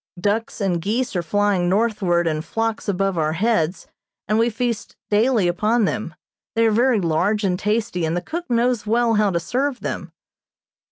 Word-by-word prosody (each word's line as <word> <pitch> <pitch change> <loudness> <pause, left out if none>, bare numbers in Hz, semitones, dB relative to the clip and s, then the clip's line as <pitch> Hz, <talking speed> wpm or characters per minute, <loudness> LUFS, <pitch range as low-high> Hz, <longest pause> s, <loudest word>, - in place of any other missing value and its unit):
Ducks 210 +5 -1
and 185 -5 0
geese 230 +5 -1
are 175 - +1
flying 195 0 +1
northward 195 -4 +1
in 155 -2 0
flocks 225 +4 -2
above 195 -2 0
our 155 0 +1
heads, 185 -3 0 0.4
and 215 +2 +2
we 230 +1 +3
feast 235 -1 -3 0.2
daily 215 -2 +3
upon 210 +6 +2
them. 195 -5 -3 0.4
They 230 0 +3
are 225 - +4
very 240 +1 +3
large 185 +5 +1
and 180 -2 0
tasty, 210 -4 -1
and 160 +2 0
the - - -1
cook 340 - -6
knows 240 -2 +1
well 230 +1 +2
how 210 -1 +3
to 170 -3 0
serve 255 +9 -2
them. - - -4
210 Hz, 175 wpm, -21 LUFS, 180-230 Hz, 0.4 s, are